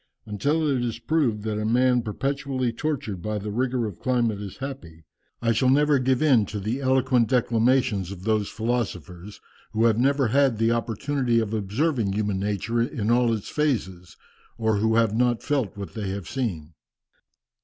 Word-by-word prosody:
Until 145 Hz, +10 st, 0 dB
it 130 Hz, -4 st, +1 dB
is 115 Hz, -2 st, -2 dB
proved 115 Hz, -4 st, 0 dB
that 110 Hz, -1 st, -2 dB
a -, -, -2 dB
man 125 Hz, +2 st, +3 dB
perpetually 130 Hz, +2 st, -2 dB
tortured 115 Hz, -, -3 dB
by 105 Hz, +2 st, -2 dB
the 105 Hz, +1 st, -5 dB
rigour 125 Hz, +1 st, 0 dB
of 105 Hz, -, -4 dB
a -, -, -23 dB
climate 120 Hz, -5 st, 0 dB
is 100 Hz, -2 st, -8 dB
happy, 130 Hz, -, -8 dB, 0.4 s
I 115 Hz, -, +3 dB
shall 120 Hz, +3 st, +2 dB
never 145 Hz, +1 st, +4 dB
give 130 Hz, +3 st, +1 dB
in 125 Hz, -9 st, +4 dB
to 105 Hz, -, -5 dB
the 110 Hz, +7 st, -3 dB
eloquent 130 Hz, -2 st, +2 dB
declamations 115 Hz, -5 st, +2 dB
of 95 Hz, -2 st, -9 dB
those 110 Hz, -1 st, 0 dB
philosophers 105 Hz, -5 st, -4 dB, 0.3 s
who 110 Hz, +2 st, +2 dB
have 115 Hz, -1 st, +3 dB
never 135 Hz, -1 st, +2 dB
had 135 Hz, -1 st, +3 dB
the 115 Hz, +1 st, +2 dB
opportunity 120 Hz, +2 st, 0 dB
of 110 Hz, -1 st, -2 dB
observing 110 Hz, +1 st, 0 dB
human 105 Hz, -2 st, -1 dB
nature 105 Hz, +3 st, -1 dB
in 115 Hz, -2 st, -1 dB
all 120 Hz, -1 st, +3 dB
its 110 Hz, -3 st, -3 dB
phases, 100 Hz, -, -2 dB, 0.4 s
or 110 Hz, -2 st, +1 dB
who 110 Hz, +2 st, +1 dB
have 115 Hz, -2 st, +2 dB
not 120 Hz, 0 st, +1 dB
felt 130 Hz, -8 st, -1 dB
what 100 Hz, -1 st, -7 dB
they 105 Hz, -3 st, -4 dB
have 95 Hz, -2 st, -5 dB
seen." 90 Hz, -, -4 dB
115 Hz, 175 wpm, -25 LUFS, 105-130 Hz, 0.4 s, never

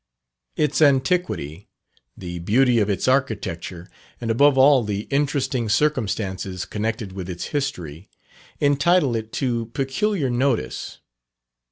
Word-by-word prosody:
Its 150 Hz, 0 st, 0 dB
antiquity, 135 Hz, -, +1 dB, 0.5 s
the 90 Hz, -2 st, -6 dB
beauty 120 Hz, +7 st, +3 dB
of 105 Hz, -1 st, +1 dB
its 100 Hz, -, -1 dB
architecture, 100 Hz, -9 st, -1 dB, 0.3 s
and 115 Hz, -1 st, -2 dB
above 140 Hz, +4 st, +4 dB
all 135 Hz, -1 st, +6 dB
the 105 Hz, -1 st, -2 dB
interesting 140 Hz, -4 st, 0 dB
circumstances 100 Hz, -, -1 dB
connected 110 Hz, -1 st, -3 dB
with 95 Hz, -1 st, -7 dB
its 90 Hz, -1 st, -5 dB
history, 95 Hz, -, -4 dB, 0.5 s
entitle 145 Hz, -1 st, +3 dB
it 110 Hz, 0 st, -4 dB
to 120 Hz, -4 st, -1 dB
peculiar 140 Hz, +5 st, 0 dB
notice. 120 Hz, -, -1 dB
120 Hz, 115 wpm, -22 LUFS, 100-140 Hz, 0.5 s, all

